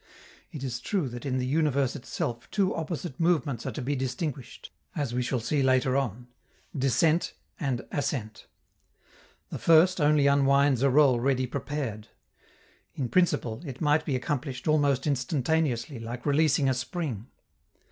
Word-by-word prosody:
It 150 -6 -7
is 125 -2 -3
true 185 - -1
that 120 +3 -7
in 130 -1 0
the 125 - -1
universe 140 -2 +1
itself 120 -3 -4
two 195 -3 +1
opposite 165 -3 -5
movements 155 -8 0
are - - -2
to 140 - -5
be 145 +3 -1
distinguished, 130 0 -5 0.2
as 145 -7 -2
we 125 - 0
shall 125 +1 -1
see 140 +5 0
later 130 0 +2
on, 125 -3 -2 0.5
"descent" 145 +5 +2 0.2
and 135 -5 -2
"ascent." 115 -6 -3 1.0
The - - -5
first 165 +2 +5
only 150 -1 +4
unwinds 140 -1 +4
a 140 - +4
roll 135 -3 +4
ready 130 +1 +1
prepared. 130 -4 -4 0.9
In 130 -4 -3
principle, 125 -10 +1
it 135 -6 -7
might 150 0 +2
be 145 -3 -1
accomplished 130 +1 -3
almost 145 -3 +2
instantaneously, 140 -1 0
like 115 +2 -7
releasing 145 -1 +3
a 130 - +3
spring. 125 - -4
135 Hz, 145 wpm, -27 LUFS, 125-150 Hz, 1.0 s, first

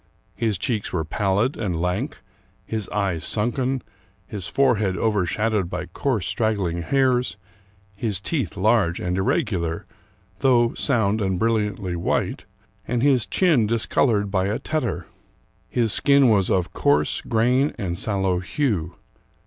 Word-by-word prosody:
His 110 -4 -1
cheeks 110 +1 -2
were 80 -3 -1
palHd 100 - 0
and 95 -7 -2
lank, 90 - -2 0.4
his 110 -3 -4
eyes 95 -5 -1
sunken, 125 +4 0 0.4
his 100 -3 -6
forehead 110 -9 +2
overshadowed 105 -1 0
by - - -4
coarse 105 +3 -2
straggling 95 -3 0
hairs, 130 +1 +1 0.6
his 105 -3 -2
teeth 110 - -3
large 100 -4 +2
and 90 0 -2
irregular, 95 - -1 0.5
though 120 -3 +3
sound 110 -6 +1
and 95 -2 0
brilliantly 105 -4 0
white, 85 - -1 0.4
and 120 0 0
his 135 -5 +3
chin 155 - +3
discolored 110 -2 +1
by 95 -1 +1
a 105 - -1
tetter. 155 -1 -2 0.6
His 115 -4 +1
skin 140 -2 +4
was 100 -4 +3
of 90 -2 0
coarse 75 +1 +2
grain 125 +5 +1
and 95 -6 -3
sallow 95 -2 0
hue. 90 - -1
105 Hz, 130 wpm, -23 LUFS, 95-120 Hz, 0.6 s, skin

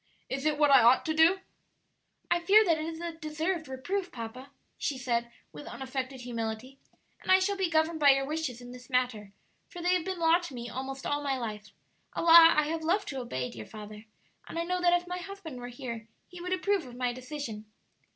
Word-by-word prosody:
'Is 270 +3 -2
it 300 -1 +1
what 295 -1 +4
I 270 -2 +8
ought 240 +3 +5
to 315 - 0
do?'" 330 +5 +4 0.9
"I 345 - +4
fear 405 +5 +6
that 330 -4 +2
is 320 +1 -5
a 340 0 -4
deserved 320 +1 -3
reproof, 355 +9 -3
papa," 245 +3 -8 0.3
she 280 - -1
said, 235 -2 -1 0.2
with 150 -1 -10
unaffected 265 0 -5
humility; 235 +2 -5 0.4
"and - - -1
I 375 - +9
shall 390 +2 0
be 380 -3 0
governed 320 0 +1
by 290 -2 +6
your 270 0 +4
wishes 290 -5 -3
in 245 0 -10
this 250 +1 -12
matter, 245 -6 -1 0.4
for 355 - -10
they 355 +1 +2
have 360 -2 +1
been 375 +1 -3
law 335 0 +4
to 345 -7 -8
me 240 0 -6
almost 265 +1 -5
all 290 0 0
my 275 -2 -1
life 215 -3 -6 0.4
(a - - -3
law 335 0 +9
I 305 - +5
have 320 +2 -2
loved 370 +6 0
to 270 - -4
obey, 130 - -4
dear 110 -2 -9
father), 210 0 -10 0.4
and - - -7
I 335 - 0
know 360 +1 -2
that 350 0 +4
if 350 - -15
my 360 0 -4
husband 360 -6 -8
were 245 - -6
here 235 -3 -7 0.2
he 355 -1 -11
would 360 +1 -5
approve 370 -3 0
of 245 - -11
my 250 -1 -1
decision." 255 -4 -6
290 Hz, 220 wpm, -29 LUFS, 245-340 Hz, 0.9 s, I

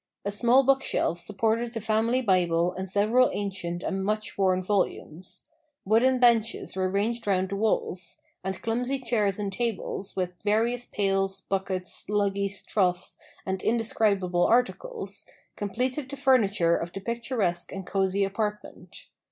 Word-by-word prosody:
A 200 - 0
small 240 +6 +4
bookshelf 270 -10 +1
supported 225 +6 0
the 225 - -3
family 225 +4 +1
Bible 180 -3 +2
and 190 +1 -5
several 215 +6 +3
ancient 190 -4 -3
and 195 0 -2
much 215 +2 -2
worn 185 -1 +2
volumes. 185 -3 -2 0.4
Wooden 235 +6 +4
benches 230 -5 +2
were 185 -1 0
ranged 220 +4 -1
round 190 -1 +1
the 200 - -2
walls; 195 -4 -1 0.2
and 190 0 -4
clumsy 245 +4 0
chairs 220 -6 0
and 200 -2 -3
tables, 215 -3 -3
with 180 -1 -1
various 230 +4 +1
pails, 195 -1 0
buckets, 190 -1 -3
luggies, 200 -1 -1
troughs, 180 -3 0 0.3
and 190 -1 -2
indescribable 205 -6 +1
articles, 350 - -1 0.3
completed 255 +7 -2
the 280 - -6
furniture 205 -11 +3
of 170 +1 -3
the - - -4
picturesque 225 -5 -2
and 195 -1 -6
cosy 195 +1 +1
apartment. 210 +1 -4
205 Hz, 135 wpm, -27 LUFS, 190-230 Hz, 0.4 s, small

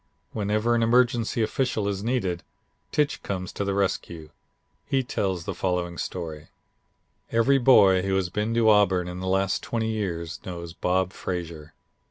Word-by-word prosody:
Whenever 105 +2 0
an 120 - +2
emergency 120 -1 +2
official 110 -2 -1
is 100 -1 -2
needed, 100 -8 -1 0.5
Tich 150 -1 0
comes 90 -2 -4
to - - -2
the 100 -1 -1
rescue. 85 -5 -2 0.6
He 135 -1 +1
tells 95 -7 -2
the - - -3
following 90 -2 -2
story: 80 -4 -5 0.8
"Every 125 +4 +4
boy 100 -7 +6
who 95 0 0
has 95 -2 0
been 105 +4 -2
to 115 -1 +3
Auburn 100 -4 +4
in 90 0 -6
the 95 - -4
last 95 0 +1
twenty 110 -1 -2
years 85 -7 -3
knows 85 -2 -7
Bob 90 +1 0
Frazier. 85 -4 -6
95 Hz, 155 wpm, -25 LUFS, 90-110 Hz, 0.8 s, boy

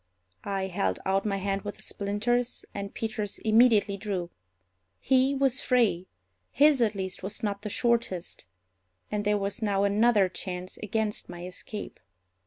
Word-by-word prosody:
I 195 -1 -1
held 190 +1 -1
out 195 +2 +1
my 200 -1 0
hand 195 0 -1
with 205 +1 -6
the - - -6
splinters, 220 +5 -1
and 200 0 -5
Peters 215 -2 -3
immediately 220 -2 +4
drew. 190 -4 -3 0.7
He 265 +1 +3
was 270 -1 +2
free—his, 195 - +1
at 220 -2 +2
least, 190 -1 -3
was 195 +4 -5
not 200 -1 -1
the 210 - -4
shortest; 230 - -1 0.6
and 210 -1 -1
there 210 0 +3
was 200 +2 -3
now 200 -2 +1
another 205 0 +4
chance 185 0 -6
against 215 0 -2
my 175 0 -7
escape. 200 +3 -7
205 Hz, 145 wpm, -28 LUFS, 195-225 Hz, 0.7 s, immediately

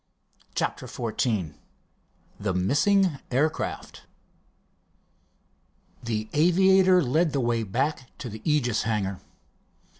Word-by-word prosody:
CHAPTER - - -2
XIV 110 - -2 0.9
THE 100 -3 -2
MISSING 145 - +2
AIRCRAFT 150 +5 -2 1.9
The 110 -2 -3
aviator 185 +3 +4
led 155 +5 +1
the 140 - 0
way 120 -2 0
back 130 +5 -2
to 130 - -7
the 110 -1 -8
Aegis 130 -7 +1
hangar. 100 -4 -2
125 Hz, 90 wpm, -26 LUFS, 110-155 Hz, 1.9 s, aviator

